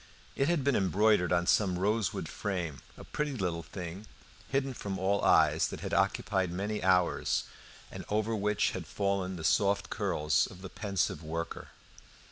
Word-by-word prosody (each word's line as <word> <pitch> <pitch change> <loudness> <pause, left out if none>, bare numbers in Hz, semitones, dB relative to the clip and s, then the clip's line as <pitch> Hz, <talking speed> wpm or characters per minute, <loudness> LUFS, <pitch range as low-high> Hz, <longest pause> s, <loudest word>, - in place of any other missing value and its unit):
It 135 - +1
had 170 -5 +1
been 140 -1 +2
embroidered 100 -1 +3
on 85 0 +2
some 95 -1 +3
rosewood 105 +2 0
frame, 90 -8 -3 0.2
a - - -10
pretty 150 -2 -3
little 90 -5 -1
thing, 90 +5 -8 0.4
hidden 135 0 0
from 100 -4 -4
all 100 +2 +1
eyes, - - +4
that - - -7
had - - -4
occupied 95 -2 +1
many 105 +4 -2
hours, 90 -1 +2 0.5
and - - -7
over 110 +2 0
which 105 0 +1
had - - -6
fallen 100 -2 -1
the 80 - -7
soft 100 +5 +2
curls 75 0 +1
of 90 - -13
the 95 - -6
pensive 100 -7 -1
worker. 85 +1 -5
95 Hz, 160 wpm, -31 LUFS, 90-105 Hz, 0.5 s, eyes